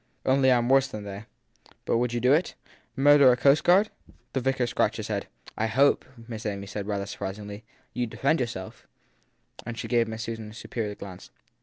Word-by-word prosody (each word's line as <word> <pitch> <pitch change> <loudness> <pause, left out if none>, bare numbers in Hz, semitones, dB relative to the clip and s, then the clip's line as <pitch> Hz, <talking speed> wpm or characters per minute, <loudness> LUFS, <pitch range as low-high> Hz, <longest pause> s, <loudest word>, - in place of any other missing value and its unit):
Only 130 0 +4
I 125 - +5
m 120 0 0
worse 135 +1 +4
than 105 -6 -7
they! 100 +1 -7 0.6
But - - +2
would 120 0 0
you 120 - -1
do 125 +3 +4
it? 165 +4 +1 0.4
Murder 140 -1 +7
a 125 - +2
coastguard? 175 +10 +4 0.4
The 135 - +1
vicar 130 -1 +1
scratched 120 - 0
his - - -5
head. - - -2 0.3
I 110 - 0
hope, 135 +6 +3 0.3
said 105 -2 -3
Miss 100 0 -8
Amy 100 -2 -3
rather 100 -1 -1
surprisingly, 100 +2 -6 0.3
you 120 -1 -1
d 115 - -11
defend 140 +8 +2
yourself. 115 -7 -5 0.8
And 120 0 -6
she - - -4
gave 120 -2 +2
Miss 110 0 -5
Susan 115 -2 -6
a - - -12
superior 110 -1 -4
glance. 95 -3 -10
120 Hz, 195 wpm, -27 LUFS, 105-135 Hz, 0.8 s, Murder